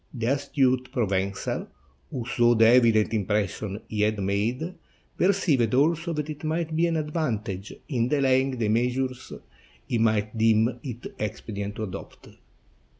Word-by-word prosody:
The 115 Hz, -2 st, -3 dB
astute 130 Hz, -3 st, +1 dB
Provencal, 100 Hz, -4 st, -1 dB, 0.4 s
who 120 Hz, -3 st, -4 dB
saw 120 Hz, -1 st, +3 dB
the 115 Hz, 0 st, +5 dB
evident 115 Hz, -2 st, +5 dB
impression 105 Hz, 0 st, -1 dB
he 105 Hz, -1 st, -2 dB
had 105 Hz, 0 st, +2 dB
made, 110 Hz, -, -1 dB, 0.4 s
perceived 160 Hz, -, +2 dB
also 165 Hz, +5 st, +2 dB
that 150 Hz, -1 st, -3 dB
it 150 Hz, -1 st, -7 dB
might 160 Hz, 0 st, -1 dB
be 170 Hz, +2 st, +3 dB
of 165 Hz, -, 0 dB
advan 150 Hz, -9 st, -2 dB
tage 95 Hz, +1 st, -6 dB, 0.2 s
in 120 Hz, -6 st, 0 dB
delaying 130 Hz, -1 st, +2 dB
the 110 Hz, -3 st, 0 dB
measures 125 Hz, +3 st, -1 dB, 0.6 s
he 120 Hz, -, 0 dB
might 110 Hz, -1 st, +1 dB
deem 115 Hz, +2 st, +3 dB
it 120 Hz, -3 st, -7 dB
expedient 105 Hz, -1 st, -4 dB
to 110 Hz, -, -4 dB
adopt. 100 Hz, -2 st, -8 dB
120 Hz, 145 wpm, -26 LUFS, 105-140 Hz, 0.6 s, the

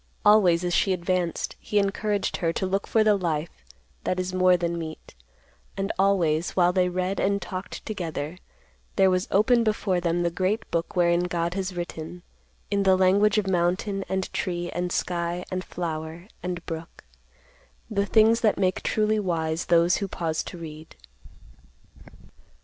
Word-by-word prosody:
Always 190 Hz, -5 st, +5 dB
as 175 Hz, 0 st, -1 dB
she 190 Hz, -, +3 dB
advanced, 180 Hz, -1 st, -1 dB
he 210 Hz, -, -2 dB
encouraged 200 Hz, 0 st, 0 dB
her 165 Hz, -2 st, 0 dB
to 190 Hz, -, -1 dB
look 195 Hz, +1 st, -1 dB
for 220 Hz, -, +3 dB
the 215 Hz, -1 st, +4 dB
life 165 Hz, -4 st, -3 dB, 0.4 s
that 185 Hz, -, -1 dB
is 185 Hz, 0 st, -3 dB
more 185 Hz, -1 st, +4 dB
than 170 Hz, 0 st, -2 dB
meat, 160 Hz, -1 st, -8 dB, 0.6 s
and 195 Hz, +1 st, -1 dB
always, 175 Hz, -5 st, +2 dB
while 180 Hz, -1 st, +4 dB
they 180 Hz, -1 st, +2 dB
read 185 Hz, +2 st, -2 dB
and 200 Hz, 0 st, +1 dB
talked 185 Hz, -1 st, -7 dB
together, 170 Hz, -5 st, -4 dB, 0.6 s
there 190 Hz, -1 st, +4 dB
was 185 Hz, 0 st, 0 dB
opened 230 Hz, +4 st, +4 dB
before 210 Hz, -4 st, 0 dB
them 175 Hz, 0 st, 0 dB
the 170 Hz, -, 0 dB
great 190 Hz, +5 st, -1 dB
book 170 Hz, +2 st, -2 dB
wherein 175 Hz, 0 st, +3 dB
God 170 Hz, -1 st, -1 dB
has 190 Hz, -1 st, -3 dB
written, 175 Hz, 0 st, -6 dB, 0.5 s
in 200 Hz, -1 st, +2 dB
the 190 Hz, -1 st, +4 dB
language 200 Hz, +3 st, +4 dB
of 210 Hz, -, +2 dB
mountain, 190 Hz, +2 st, 0 dB
and 190 Hz, 0 st, -2 dB
tree, 175 Hz, -1 st, -2 dB
and 175 Hz, +1 st, -2 dB
sky, 175 Hz, 0 st, -2 dB
and 185 Hz, 0 st, -2 dB
flower, 165 Hz, 0 st, -5 dB
and 180 Hz, -1 st, -4 dB
brook, 165 Hz, -1 st, -7 dB, 0.8 s
the 200 Hz, -2 st, -1 dB
things 225 Hz, +2 st, +4 dB
that 215 Hz, -3 st, +3 dB
make 185 Hz, -1 st, +1 dB
truly 215 Hz, 0 st, +1 dB
wise 165 Hz, -4 st, -1 dB
those 170 Hz, +1 st, +4 dB
who 200 Hz, -, -2 dB
pause 165 Hz, -4 st, -2 dB
to -, -, -8 dB
read. 155 Hz, -1 st, -10 dB
180 Hz, 160 wpm, -25 LUFS, 170-195 Hz, 0.8 s, Always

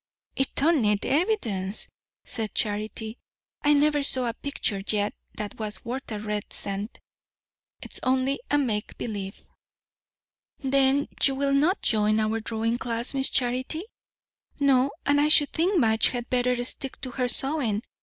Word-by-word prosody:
"It 270 Hz, -, -1 dB
don't 315 Hz, 0 st, +3 dB
need 210 Hz, -2 st, +1 dB
evidence," 235 Hz, -, 0 dB, 0.4 s
said 220 Hz, -2 st, -4 dB
Charity. 215 Hz, +2 st, -1 dB, 0.4 s
"I 295 Hz, -, +4 dB
never 295 Hz, 0 st, +3 dB
saw 260 Hz, -2 st, +4 dB
a 230 Hz, -, -1 dB
picture 225 Hz, -6 st, -2 dB
yet 210 Hz, -1 st, 0 dB, 0.2 s
that 210 Hz, 0 st, -6 dB
was 210 Hz, -3 st, -4 dB
worth 250 Hz, +1 st, -5 dB
a 215 Hz, -, -3 dB
red 210 Hz, -1 st, -4 dB
cent. 200 Hz, +3 st, -4 dB, 0.8 s
It's -, -, -7 dB
only 260 Hz, +1 st, +1 dB
a 290 Hz, -, +3 dB
make 225 Hz, -7 st, -2 dB
believe." 200 Hz, -4 st, -6 dB, 1.1 s
"Then 275 Hz, +1 st, +2 dB
you 270 Hz, -, +4 dB
will 275 Hz, 0 st, 0 dB
not 310 Hz, +8 st, +2 dB
join 215 Hz, -1 st, +2 dB
our 220 Hz, +1 st, 0 dB
drawing 225 Hz, +1 st, -2 dB
class, 235 Hz, 0 st, -1 dB
Miss 270 Hz, -1 st, +2 dB
Charity?" 255 Hz, +6 st, 0 dB, 0.8 s
"No; 275 Hz, -1 st, +4 dB, 0.2 s
and 285 Hz, +1 st, +3 dB
I 295 Hz, -, +3 dB
should 295 Hz, -2 st, +5 dB
think 355 Hz, +3 st, +2 dB
Madge 220 Hz, -4 st, +4 dB
had 245 Hz, -1 st, -5 dB
better 250 Hz, -1 st, +1 dB
stick 265 Hz, +2 st, -2 dB
to 255 Hz, -, -5 dB
her 250 Hz, 0 st, -1 dB
sewing. 245 Hz, -4 st, +2 dB
250 Hz, 150 wpm, -26 LUFS, 215-275 Hz, 1.1 s, should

